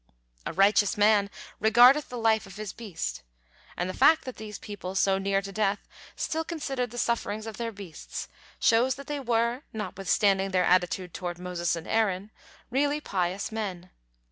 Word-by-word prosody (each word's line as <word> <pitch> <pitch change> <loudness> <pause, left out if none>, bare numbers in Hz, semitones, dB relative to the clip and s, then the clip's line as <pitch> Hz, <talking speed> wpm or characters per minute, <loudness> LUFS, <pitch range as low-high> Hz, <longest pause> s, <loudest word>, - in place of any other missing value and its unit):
"A - - -2
righteous 205 +2 +4
man 205 -1 +4 0.3
regardeth 245 +7 +6
the 250 - -6
life 220 -3 +2
of 195 - -12
his 215 -2 -6
beast," 205 - -5 0.6
and 175 - -1
the 185 - -4
fact 315 +7 +5
that 255 - -7
these 215 -1 -7
people, 195 -3 -7
so 195 0 +3
near 195 0 0
to 195 - -6
death, 205 -1 -1 0.3
still 320 +1 -2
considered 275 -7 -3
the 240 - -10
sufferings 220 -3 -1
of 225 -2 -7
their 230 -1 -3
beasts 195 -7 -8 0.3
shows 240 +3 +3
that 280 - -10
they 295 0 -3
were, 235 0 0
notwithstanding 195 -2 +1
their 185 -1 +2
attitude 180 0 +1
toward 175 -2 -4
Moses 175 -1 -2
and 165 0 -7
Aaron, 210 -2 0 0.4
really 290 +3 +1
pious 190 -6 -2
men. 190 -5 -5
210 Hz, 170 wpm, -27 LUFS, 190-235 Hz, 0.6 s, regardeth